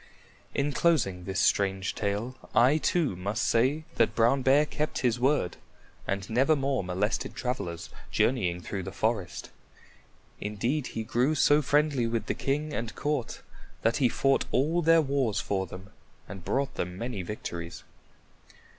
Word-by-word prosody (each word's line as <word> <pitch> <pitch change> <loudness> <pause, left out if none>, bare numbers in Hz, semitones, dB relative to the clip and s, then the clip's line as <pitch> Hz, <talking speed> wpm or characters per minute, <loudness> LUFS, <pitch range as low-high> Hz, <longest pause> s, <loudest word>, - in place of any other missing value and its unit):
In 140 +1 +1
closing 115 - +1
this 95 -1 -2
strange 95 -1 +1
tale, 105 +5 -2 0.2
I 130 +6 +5
too 160 - +1
must 100 +6 -2
say 130 +7 +2
that 115 - +3
Brown 120 +4 +3
Bear 135 +3 +5
kept 150 0 -3
his 120 0 +2
word 130 -9 +1 0.5
and 95 -1 -2
nevermore 135 0 +2
molested 95 +5 -2
travelers 85 -10 -4 0.2
journeying 90 -9 +1
through 95 +2 -4
the 90 - -6
forest. 110 -5 -2 0.9
Indeed, 120 +7 -1
he 110 - -1
grew 125 +7 +1
so 145 +1 +4
friendly 145 -3 +2
with 115 0 -1
the - - -1
king 150 +2 -2
and 115 -1 -4
court 145 -5 -2 0.4
that 115 - +2
he 130 -3 +3
fought 135 +3 +2
all 155 +7 +2
their 165 0 +5
wars 135 -7 0
for 95 -1 -1
them 95 +4 -10 0.4
and 95 -3 -9
brought 135 +8 -1
them 90 +1 -4
many 115 -2 -4
victories. 85 -3 -6
120 Hz, 145 wpm, -28 LUFS, 100-140 Hz, 0.9 s, I